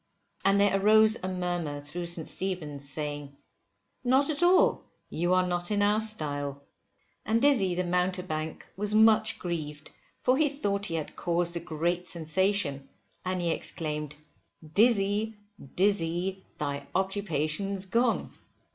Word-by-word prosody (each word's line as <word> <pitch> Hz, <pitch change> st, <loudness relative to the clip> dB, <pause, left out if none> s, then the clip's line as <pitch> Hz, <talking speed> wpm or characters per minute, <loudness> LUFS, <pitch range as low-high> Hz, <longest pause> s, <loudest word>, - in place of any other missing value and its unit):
And 195 Hz, +1 st, +4 dB
there 200 Hz, -1 st, +3 dB
arose 215 Hz, +1 st, +6 dB
a 185 Hz, -, -3 dB
murmur 175 Hz, -5 st, -2 dB
through 160 Hz, +5 st, -5 dB
St. 170 Hz, -2 st, -3 dB
Stephen's, 150 Hz, -7 st, -4 dB
saying, 145 Hz, -1 st, -4 dB, 0.7 s
Not 265 Hz, +4 st, +3 dB
at 295 Hz, +1 st, -1 dB
all, 355 Hz, +1 st, +4 dB, 0.3 s
you 175 Hz, +3 st, +1 dB
are 185 Hz, 0 st, +3 dB
not 175 Hz, -1 st, -2 dB
in 205 Hz, -1 st, +1 dB
our 210 Hz, +2 st, +3 dB
style. 145 Hz, -9 st, -2 dB, 0.6 s
And 225 Hz, +1 st, +1 dB
Dizzy 230 Hz, -10 st, +3 dB
the 180 Hz, -, 0 dB
mountebank 180 Hz, -3 st, -2 dB
was 210 Hz, +2 st, -1 dB
much 220 Hz, 0 st, +5 dB
grieved 155 Hz, -4 st, -5 dB, 0.3 s
for 255 Hz, +1 st, +2 dB
he 305 Hz, -2 st, +4 dB
thought 205 Hz, -8 st, -1 dB
he 165 Hz, -, -3 dB
had 155 Hz, -2 st, -4 dB
caused 170 Hz, 0 st, 0 dB
a -, -, -1 dB
great 170 Hz, +2 st, -2 dB
sensation, 160 Hz, -4 st, -1 dB, 0.3 s
and 185 Hz, 0 st, -2 dB
he 170 Hz, -1 st, +1 dB
exclaimed, 150 Hz, -3 st, -3 dB, 0.6 s
Dizzy, 215 Hz, 0 st, +3 dB, 0.4 s
Dizzy, 185 Hz, -1 st, 0 dB
thy 140 Hz, -1 st, -3 dB
occupation's 190 Hz, 0 st, -1 dB
gone. 230 Hz, +5 st, +1 dB
180 Hz, 135 wpm, -28 LUFS, 155-205 Hz, 0.7 s, arose